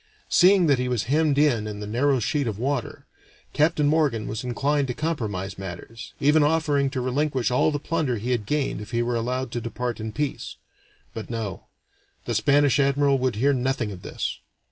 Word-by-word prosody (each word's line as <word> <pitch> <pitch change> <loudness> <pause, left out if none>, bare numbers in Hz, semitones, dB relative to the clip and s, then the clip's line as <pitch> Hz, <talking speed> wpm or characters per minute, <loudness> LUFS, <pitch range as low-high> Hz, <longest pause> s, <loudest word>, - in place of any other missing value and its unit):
Seeing 185 0 +5
that 140 -5 +3
he 125 0 -1
was 125 -4 0
hemmed 150 +2 +1
in 125 -8 +2
in 105 -1 -6
the 105 - -5
narrow 130 +5 +1
sheet 140 +3 -1
of 105 -3 -3
water, 130 +1 -3 0.5
Captain 150 0 +2
Morgan 145 -8 +2
was 110 +3 -4
inclined 140 +3 0
to 125 - -3
compromise 105 - -3
matters, 95 +5 -8
even 150 +3 +4
offering 145 -2 +2
to 130 -1 -3
relinquish 130 -1 0
all 125 - +3
the 150 - -1
plunder 150 -5 -1
he 120 +5 -3
had 110 -5 -1
gained 150 -7 -1
if 105 - -9
he 120 -1 0
were 120 0 -1
allowed 125 +2 -2
to 120 - -3
depart 120 +1 -4
in 110 0 -4
peace. 145 +4 -3 0.6
But 110 - -7
no; 115 -5 -5 0.6
the 120 - -2
Spanish 145 +5 +3
admiral 140 0 +3
would 130 -3 0
hear 140 +6 +2
nothing 130 -4 -1
of 90 -2 -9
this. - - -4
130 Hz, 190 wpm, -24 LUFS, 115-145 Hz, 0.6 s, Seeing